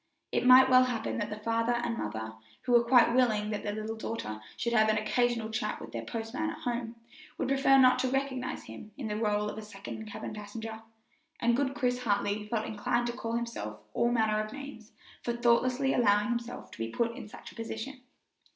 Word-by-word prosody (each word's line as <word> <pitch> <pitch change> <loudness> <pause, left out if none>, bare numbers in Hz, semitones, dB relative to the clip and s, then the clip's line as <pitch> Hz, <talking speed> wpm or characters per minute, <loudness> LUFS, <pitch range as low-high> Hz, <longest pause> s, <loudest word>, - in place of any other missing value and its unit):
It - - +1
might 255 +1 +9
well 255 0 +6
happen 235 -2 -2
that 210 -1 -2
the 210 - -5
father 230 +2 0
and 240 -1 -1
mother, 110 - -4 0.3
who - - -2
were 240 -1 +6
quite 235 0 +5
willing 220 -4 +2
that 210 - -2
their 205 - -2
little 215 +1 -4
daughter 220 - -5 0.2
should 235 0 -1
have 220 -2 +5
an 215 - +3
occasional 230 +1 0
chat 225 +3 -2
with - - -9
the - - -4
postman 235 +8 -3
at - - -6
home, 235 -1 -3 0.4
would - - -1
prefer 270 0 +5
not 255 -1 +6
to 260 - +1
recognize 265 -1 -2
him 115 - -11
in 250 - -4
the 210 - -2
role 210 -1 +1
of 210 - -5
a - - -6
second 210 +1 -8
cabin 210 - -6
passenger; 220 +1 -7 0.6
and 235 0 +3
good 275 +1 0
Chris 250 -3 0
Hartley 210 -2 0
felt 220 0 -1
inclined 220 +3 0
to 240 - -2
call 230 -1 -4
himself 235 0 -4
all 235 0 +2
manner 215 -2 +2
of 215 - -8
names 275 -5 -9 0.3
for 240 - -2
thoughtlessly 245 +3 +2
allowing 210 -2 +3
himself 240 0 -4
to - - -12
be 115 0 -2
put 230 - -1
in 255 - -8
such - - -11
a - - -18
position. 230 +3 -6
230 Hz, 210 wpm, -30 LUFS, 215-245 Hz, 0.6 s, might